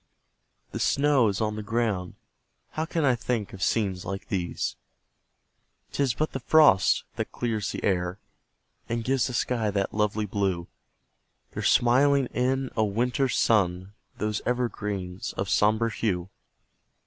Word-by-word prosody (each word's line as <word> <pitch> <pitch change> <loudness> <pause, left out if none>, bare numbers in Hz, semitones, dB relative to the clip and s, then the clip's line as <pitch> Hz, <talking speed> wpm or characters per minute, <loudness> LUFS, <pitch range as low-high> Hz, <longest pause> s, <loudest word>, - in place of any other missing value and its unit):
the - - -4
snow 140 -4 +3
is 100 -2 -1
on 105 -1 -1
the 110 - -4
ground 105 -4 -1 0.6
How 155 - -2
can 160 -2 -1
I 130 - +4
think 115 -3 -2
of 95 - -9
scenes 95 -2 0
like 95 +1 -6
these? 90 -3 -2 1.2
'Tis 135 -5 0
but 155 +5 -1
the 135 - -4
FROST 145 -7 +5
that - - -3
clears 110 -4 -2
the - - -6
air, 90 -1 0 0.7
And 115 0 -1
gives 130 +1 +1
the 125 - -5
sky 115 -4 0
that 100 -1 -1
lovely 105 0 0
blue; 95 -4 -1 0.8
They're - - -5
smiling 135 +3 +4
in 130 +1 0
a 110 - +2
WINTER'S 125 +5 0
sun, 95 -3 +1 0.2
Those 105 0 -2
evergreens 105 -7 -3
of 100 - -3
sombre 110 +2 +2
hue. 95 -4 -2
110 Hz, 140 wpm, -26 LUFS, 95-125 Hz, 1.2 s, FROST